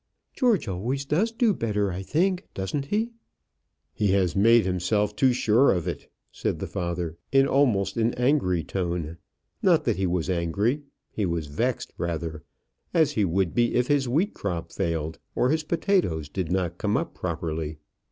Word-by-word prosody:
"George 230 - +2
always 120 +9 -2
does 180 +11 +1
do 230 -2 +2
better, 105 - -1
I 90 +2 -4
think; 180 - 0
doesn't 100 +9 -2
he?" 220 +9 -1 0.8
"He 105 - 0
has 95 -3 +2
made 115 +2 +5
himself 100 +3 0
too 130 +4 +4
sure 120 +2 +4
of 90 -1 -1
it," 85 - -5 0.2
said - - -2
the - - -4
father, 85 -2 -3
in 135 0 +5
almost 125 -8 +2
an 115 +1 +1
angry 125 - +2
tone. 85 -2 -3 0.4
Not - - +4
that - - 0
he 95 -1 +1
was 90 -1 -1
angry; 95 - 0 0.3
he 105 -3 -1
was 85 -2 -2
vexed, 70 0 -2
rather, 80 -2 -3 0.5
as 160 -3 +4
he 105 -8 +1
would 95 0 0
be 120 -1 +2
if 125 0 +2
his 140 -3 +2
wheat 165 - +1
crop 85 -4 -4
failed, 80 -4 -2 0.2
or 125 - +2
his 155 0 +1
potatoes 160 - 0
did 90 +1 -3
not 90 -2 -1
come - - +1
up - - -3
properly. 80 -3 -3
100 Hz, 170 wpm, -26 LUFS, 85-135 Hz, 0.8 s, made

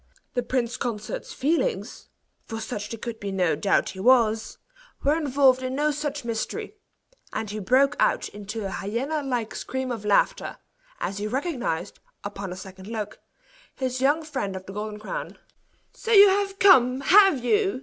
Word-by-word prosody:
The 245 - 0
prince 245 0 -1
consort's 220 -4 -4
feelings 335 - -1 0.4
for 225 -1 -5
such 210 -2 -5
there 230 - -5
could 225 0 -6
be 200 -1 -4
no 180 -5 +1
doubt 195 +7 +1
he 190 - -9
was 225 -1 +3 0.5
were 290 +2 +3
involved 275 -4 +3
in 255 0 -3
no 300 +2 +2
such 290 -2 -4
mystery; 240 - -3 0.6
and 220 - -2
he 215 - -4
broke 265 +8 +3
out - - +2
into 205 +1 -6
a 195 - -3
hyena 255 +12 -2
like 245 -5 -2
scream 260 -1 -4
of 225 -3 -4
laughter, 210 - +1 0.4
as 200 +1 -3
he 210 - -2
recognized, 255 - -2 0.2
upon 200 -2 -5
a - - -5
second 190 0 -10
look, 215 -2 -5 0.6
his 255 -1 -2
young 290 +4 +3
friend 260 -11 -3
of 190 0 -7
the 195 - -9
Golden 210 +1 -5
Crown. 215 - -6 0.6
"So 455 - -5
you 405 -2 +9
have 390 0 0
come, 260 -10 +6
have 375 -7 +5
you?" 395 - +2
245 Hz, 170 wpm, -25 LUFS, 210-290 Hz, 0.6 s, you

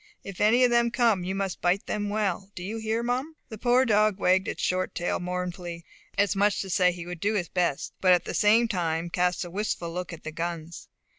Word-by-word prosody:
If 195 -1 -7
any 230 +4 +5
of 245 - +4
them 235 0 +3
come 230 -6 +2
you 190 +2 -3
must 195 -2 -3
bite 180 +3 +1
them 205 -1 -2
well; 200 -2 -1
do 175 - -6
you 210 +4 -4
hear, 220 +1 -1
Mum?" 255 +6 -2
The 220 - -8
poor 250 +2 +3
dog 215 -3 +3
wagged 185 0 +2
his - - -4
short 185 0 -1
tail 175 - -1
mournfully, 180 -1 -5 0.3
as 200 0 +2
much 200 +1 +3
as - - -2
to 195 - -6
say 180 0 +4
he 175 -1 -8
would 175 -1 -7
do 205 +5 0
his 175 -5 -1
best; 175 -6 -1
but 185 - +5
at 180 - +4
the - - -4
same 225 +3 +4
time 170 -4 -2
cast 180 +1 0
a 175 - -9
wistful 175 -4 -3
look 180 +1 -4
at 170 - -9
the 155 - -5
guns. 165 0 -5
190 Hz, 235 wpm, -27 LUFS, 175-215 Hz, 0.3 s, any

